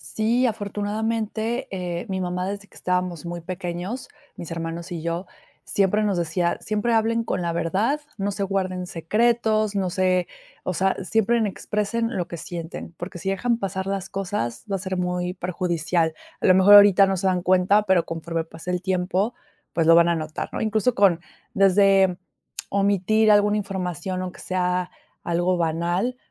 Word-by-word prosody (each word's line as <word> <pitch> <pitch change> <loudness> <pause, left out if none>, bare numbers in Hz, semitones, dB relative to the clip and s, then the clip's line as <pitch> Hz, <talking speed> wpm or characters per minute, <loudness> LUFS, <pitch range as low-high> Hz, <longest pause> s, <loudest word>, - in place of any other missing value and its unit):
Sí, 235 +4 +2
afortunadamente, 220 +3 -2
eh, 180 -2 -4
mi 190 0 -2
mamá 180 +1 -2
desde 200 0 -6
que - - -23
estábamos 180 -3 -2
muy 175 0 -5
pequeños, 180 +6 -5 0.3
mis 170 - -7
hermanos 165 +2 -5
y 165 -2 -5
yo, 170 +2 -3 0.4
siempre 200 +2 +2
nos 200 -4 +1
decía: 170 +1 0
"Siempre 215 +2 0
hablen 230 +1 +2
con 180 - -2
la 170 -1 -1
verdad. 195 - 0 0.2
No 200 +1 -1
se 200 - -5
guarden 185 -2 -2
secretos. 215 +4 +1
No 185 -2 0
se, 185 -1 +1 0.4
o 185 - -2
sea, 190 +2 +1
siempre 225 +4 +2
expresen 210 +3 -2
lo 175 -1 -2
que 170 - -7
sienten, 170 0 -7
porque 175 0 -7
si 195 - -3
dejan 235 +4 0
pasar 190 -1 -3
las 195 -1 -3
cosas, 195 - -3
va 195 - 0
a - - -9
ser 185 0 -3
muy 180 0 -2
perjudicial. 170 -2 -1 0.3
A - - +2
lo 185 - +7
mejor 190 +2 +7
ahorita 200 -1 +8
no 195 0 0
se 190 +1 -1
dan 180 -1 +1
cuenta, 185 +3 +4
pero 190 -4 +3
conforme 165 0 -3
pase 165 +2 -7
el 180 0 -1
tiempo, 190 +4 0 0.4
pues, 165 -2 +1
lo 165 - +7
van 170 0 +6
a 170 - +2
notar", 155 -1 -4
¿no?, - - -4
incluso 220 +3 +1
con 190 -4 +4 0.3
desde 195 -1 +4 0.5
omitir 200 +2 +2
alguna 205 0 +4
información, 185 -2 -3
aunque 185 - -7
sea 180 -1 -1 0.3
algo 175 +2 +1
banal. 175 +9 0
185 Hz, 170 wpm, -24 LUFS, 175-205 Hz, 0.5 s, ahorita